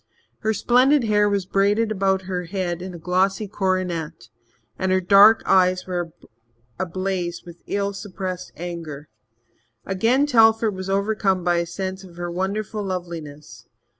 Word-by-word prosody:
Her 220 - 0
splendid 255 +5 +3
hair 210 -2 +3
was 200 -2 -1
braided 205 +3 +1
about 190 -2 +1
her 180 -1 -4
head 175 -1 -3
in 185 -1 -7
a - - -7
glossy 190 +4 0
coronet, 185 -5 -2 0.5
and 190 0 0
her 185 - +3
dark 200 +4 +6
eyes 185 -1 +3
were 175 -2 -3 0.7
ablaze 185 -1 -3
with 170 -1 -11
ill 200 0 -1
suppressed 185 -2 -6
anger. 165 -4 -7 0.8
Again 225 +9 +2
Telford 225 -4 +4
was 190 0 -6
overcome 195 -2 0
by 175 -1 +2
a 170 0 -1
sense 190 +2 -5
of 180 -3 -14
her 175 0 -4
wonderful 200 +4 -3
loveliness. 160 - -7
190 Hz, 140 wpm, -22 LUFS, 175-205 Hz, 0.8 s, dark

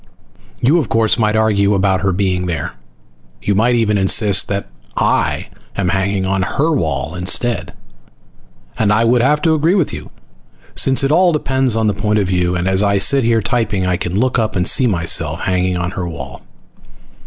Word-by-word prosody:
You, 150 +8 +4
of 145 - -3
course, 115 0 +1
might 105 -1 +1
argue 105 -2 +2
about 95 -1 +1
her 95 0 0
being 90 -1 -1
there. 85 -2 -3 0.7
You 100 - 0
might 115 +5 +2
even 105 -3 +1
insist 100 +1 +3
that 100 0 -3 0.3
I - - 0 0.3
am 95 -3 -1
hanging 95 +1 -1
on 95 0 -1
her 140 - -1
wall 80 - -2
instead. 95 +7 -1 1.0
And 105 -2 +2
I 110 +2 +2
would 120 +1 +3
have 150 +4 +1
to 160 - +3
agree 160 +4 +1
with 180 -7 0
you, - - -8 0.6
since 135 0 +3
it 135 - +1
all 175 +3 +4
depends 135 -5 0
on 110 0 0
the 105 - +1
point 105 +1 -1
of 100 -3 0
view 90 -1 0
and 90 +1 -2
as 95 +1 +2
I 100 -1 +2
sit 135 +7 +3
here 115 -2 +1
typing 100 -3 -1
I 90 -1 0
can 90 +2 -3
look 130 +1 +1
up 110 -1 -2
and 90 -1 0
see 130 - +3
myself 85 -4 0
hanging 90 -1 -1
on 90 0 -3
her 90 -2 -5
wall. 65 -6 -9
100 Hz, 190 wpm, -16 LUFS, 90-120 Hz, 1.0 s, You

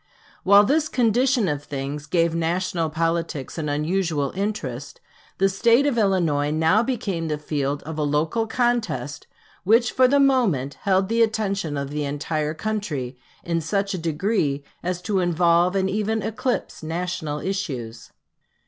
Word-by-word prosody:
While 200 +2 +7
this 295 +8 +1
condition 245 -1 +2
of 145 -3 -2
things 140 +1 -5
gave 165 0 +2
national 170 0 -1
politics 165 -2 -2
an 150 -2 -2
unusual 150 -1 0
interest, 165 - -4 0.4
the 195 - +3
State 230 +7 +3
of 285 -4 +1
Illinois 175 -9 +1
now 160 +7 +3
became 200 -9 -2
the 150 -1 -1
field 145 -1 -2
of 155 +1 -6
a - - +1
local 155 +10 0
contest 235 - -1 0.4
which 225 +5 +4
for 255 0 +4
the 280 +2 +3
moment 225 - +2
held 190 -1 +3
the 230 +2 +1
attention 200 -8 0
of 140 0 -4
the 150 0 -2
entire 150 +2 -2
country 155 - -3 0.2
in 170 -1 -1
such 195 +5 -1
a 185 - -3
degree 160 -3 0 0.2
as 180 0 -3
to 200 -2 0
involve 175 +1 +3
and 190 -1 +1
even 215 +2 -1
eclipse 225 +3 -2
national 160 -2 -3
issues. 135 - -4
175 Hz, 150 wpm, -23 LUFS, 150-210 Hz, 0.4 s, While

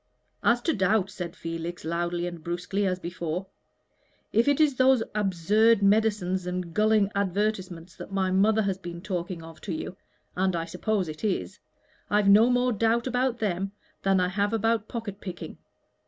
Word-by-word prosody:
"As 240 +1 +3
to 325 - +1
doubt," 195 -1 +1
said 175 -2 -6
Felix, 165 +1 -5
loudly 175 +1 -1
and 170 -2 -6
brusquely 180 +4 -1
as 185 -1 0
before, 175 0 -4 0.9
"if 230 +4 +3
it 285 0 +3
is 305 -3 +4
those 255 -2 +4
absurd 210 +2 +3
medicines 200 -3 +2
and 180 -2 -4
gulling 215 -1 +3
advertisements 190 -3 -2
that - - -9
my 190 -1 0
mother 215 +3 +3
has 195 -1 -1
been 175 -1 -8
talking 175 -3 -4
of 160 -1 -12
to 200 - -5
you 165 +3 -4 0.4
and 185 0 +1
I 165 -1 -2
suppose 185 +3 -1
it 155 +4 -8
is 205 -4 -2 0.5
I've 205 -1 +3
no 215 +4 +7
more 250 0 +2
doubt 230 +2 +1
about 250 -1 0
them 195 -2 -2 0.3
than 195 -1 +3
I 180 0 +1
have 205 +3 0
about 225 -1 +1
pocket 210 -4 -6
picking. 180 -3 -7
195 Hz, 170 wpm, -27 LUFS, 175-220 Hz, 0.9 s, no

